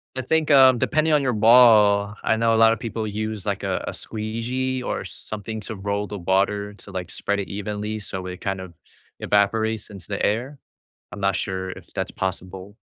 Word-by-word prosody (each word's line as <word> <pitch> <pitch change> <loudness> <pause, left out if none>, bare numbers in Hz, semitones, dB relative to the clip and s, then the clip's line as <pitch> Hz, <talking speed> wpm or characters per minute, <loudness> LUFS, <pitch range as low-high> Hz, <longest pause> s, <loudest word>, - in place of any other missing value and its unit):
I 130 - -2
think, 155 +4 0
um, 130 -3 +7
depending 155 +4 +2
on 150 - +4
your 125 -3 0
ball, 105 -3 +6
I 110 - +2
know 115 0 +3
a - - +2
lotta 115 0 +5
people 115 -2 -4
use 110 -1 -4
like, - - -2
uh, - - -1
a - - -3
squeegee 125 +4 -3
or - - -3
something 110 +1 -7
to 110 +2 -6
roll 100 +1 -2
the 105 - -6
water 100 +3 0
to 100 - -12
like 90 -2 -5
spread 100 0 -1
it 100 - -3
evenly, 105 +2 -4
so 95 -2 -5
it 90 0 -7
kind 95 -1 -2
of 90 -2 -10 0.5
evaporates 110 +2 +1
into 100 -3 -10
the 100 -2 -3
air. 125 +7 -1 0.5
I'm 100 - -8
not 100 -2 +1
sure 95 0 -3
if - - -13
that's - - -3
possible 95 +2 -5
105 Hz, 195 wpm, -23 LUFS, 100-115 Hz, 0.5 s, um